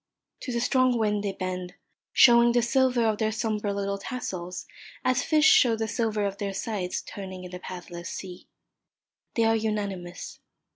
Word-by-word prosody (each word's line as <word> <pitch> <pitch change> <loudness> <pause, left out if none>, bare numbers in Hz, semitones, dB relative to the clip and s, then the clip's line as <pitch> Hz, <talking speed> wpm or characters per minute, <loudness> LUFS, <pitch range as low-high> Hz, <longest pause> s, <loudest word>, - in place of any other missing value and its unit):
To 255 - -5
the 235 - -1
strong 255 0 +3
wind 210 -2 0
they 200 - -1
bend, 185 -1 -5 0.4
showing 235 -1 +6
the 240 -1 +3
silver 255 -1 +2
of 215 -2 +1
their 220 -1 +1
sombre 215 -2 -1
little 200 0 -2
tassels 185 -7 -5 0.4
as 255 +1 +3
fish 310 +1 +3
show 245 -6 +6
the 220 0 -2
silver 220 -2 -1
of 200 0 -3
their 200 -1 -2
sides 195 -3 -3
turning 190 -2 -8
in 180 - -9
the 180 - -7
pathless 175 -1 -8
sea. 180 -2 -8 0.9
They 230 - +3
are 225 0 +4
unanimous. 200 -5 -4
210 Hz, 165 wpm, -27 LUFS, 190-235 Hz, 0.9 s, showing